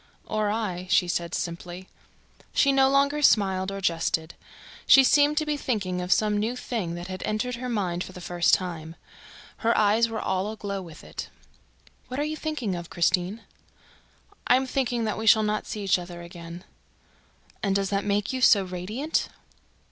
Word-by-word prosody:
"Or 215 Hz, -1 st, -1 dB
I," 195 Hz, -4 st, -3 dB
she 195 Hz, -2 st, +4 dB
said 170 Hz, -1 st, -2 dB
simply. 175 Hz, +2 st, -5 dB, 0.7 s
She 280 Hz, -, +4 dB
no 270 Hz, 0 st, +4 dB
longer 280 Hz, +2 st, +2 dB
smiled 190 Hz, -7 st, +3 dB
or 195 Hz, -, -5 dB
jested. 165 Hz, -2 st, 0 dB, 0.5 s
She 270 Hz, -, +8 dB
seemed 290 Hz, +3 st, +4 dB
to 310 Hz, -, +2 dB
be 300 Hz, -1 st, -1 dB
thinking 195 Hz, -9 st, -2 dB
of 180 Hz, +1 st, -4 dB
some 210 Hz, 0 st, +3 dB
new 225 Hz, +4 st, -1 dB
thing 215 Hz, -9 st, -3 dB
that 175 Hz, 0 st, -6 dB
had 185 Hz, 0 st, -6 dB
entered 235 Hz, +3 st, -2 dB
her 250 Hz, +1 st, -5 dB
mind 185 Hz, -6 st, -1 dB
for -, -, -10 dB
the 185 Hz, -, -10 dB
first 175 Hz, 0 st, +1 dB
time. 165 Hz, -3 st, -6 dB, 0.6 s
Her 230 Hz, +1 st, +1 dB
eyes 215 Hz, +2 st, +3 dB
were 225 Hz, -, -3 dB
all 190 Hz, +2 st, -1 dB
aglow 200 Hz, -3 st, -5 dB
with 165 Hz, -3 st, -12 dB
it. -, -, -7 dB, 0.8 s
"What 255 Hz, +2 st, -5 dB
are -, -, +1 dB
you 305 Hz, +1 st, -2 dB
thinking 305 Hz, -11 st, -3 dB
of, 170 Hz, -1 st, -6 dB
Christine?" 180 Hz, +5 st, 0 dB, 1.1 s
"I 245 Hz, -, +6 dB
am 265 Hz, +1 st, +1 dB
thinking 250 Hz, -3 st, -1 dB
that 215 Hz, -1 st, -2 dB
we 220 Hz, -, -3 dB
shall 220 Hz, -1 st, +7 dB
not 210 Hz, 0 st, -1 dB
see 210 Hz, -, -5 dB
each 190 Hz, -2 st, +3 dB
other 175 Hz, -1 st, -8 dB
again 170 Hz, 0 st, -10 dB, 0.5 s
..." -, -, -33 dB
"And 195 Hz, -2 st, 0 dB
does 195 Hz, 0 st, 0 dB
that 200 Hz, 0 st, 0 dB
make 205 Hz, +3 st, 0 dB
you 260 Hz, -, -2 dB
so 205 Hz, -5 st, +6 dB
radiant?" 190 Hz, -, -2 dB
205 Hz, 185 wpm, -26 LUFS, 180-235 Hz, 1.1 s, She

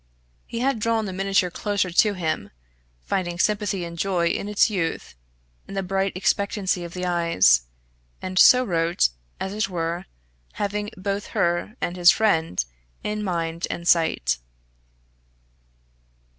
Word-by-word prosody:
He 230 Hz, -, -4 dB
had 265 Hz, -2 st, +1 dB
drawn 225 Hz, 0 st, +1 dB
the 190 Hz, -, -5 dB
miniature 195 Hz, -1 st, +1 dB
closer 200 Hz, -1 st, -1 dB
to 205 Hz, +4 st, +4 dB
him, 155 Hz, -, -2 dB, 0.5 s
finding 175 Hz, -, -2 dB
sympathy 205 Hz, -2 st, 0 dB
and 170 Hz, 0 st, -8 dB
joy 175 Hz, -3 st, +1 dB
in 200 Hz, -, -2 dB
its 210 Hz, -, +4 dB
youth, 185 Hz, -6 st, -3 dB, 0.5 s
in 195 Hz, -, -8 dB
the 195 Hz, -, -1 dB
bright 195 Hz, +1 st, 0 dB
expectancy 195 Hz, -1 st, 0 dB
of 170 Hz, 0 st, -8 dB
the 180 Hz, 0 st, -3 dB
eyes, 165 Hz, -, +3 dB, 0.5 s
and 185 Hz, 0 st, -2 dB
so 250 Hz, 0 st, +8 dB
wrote, 170 Hz, -, +1 dB, 0.3 s
as 190 Hz, -, -3 dB
it 210 Hz, -2 st, -1 dB
were, 170 Hz, 0 st, -3 dB, 0.5 s
having 205 Hz, +1 st, -2 dB
both 200 Hz, +2 st, -3 dB
her 175 Hz, +6 st, 0 dB
and 175 Hz, +1 st, -2 dB
his 175 Hz, -1 st, +7 dB
friend 165 Hz, -, +2 dB, 0.4 s
in 210 Hz, 0 st, -2 dB
mind 170 Hz, -3 st, -2 dB
and 170 Hz, 0 st, -5 dB
sight. 65 Hz, -, +2 dB
185 Hz, 140 wpm, -24 LUFS, 170-205 Hz, 0.5 s, so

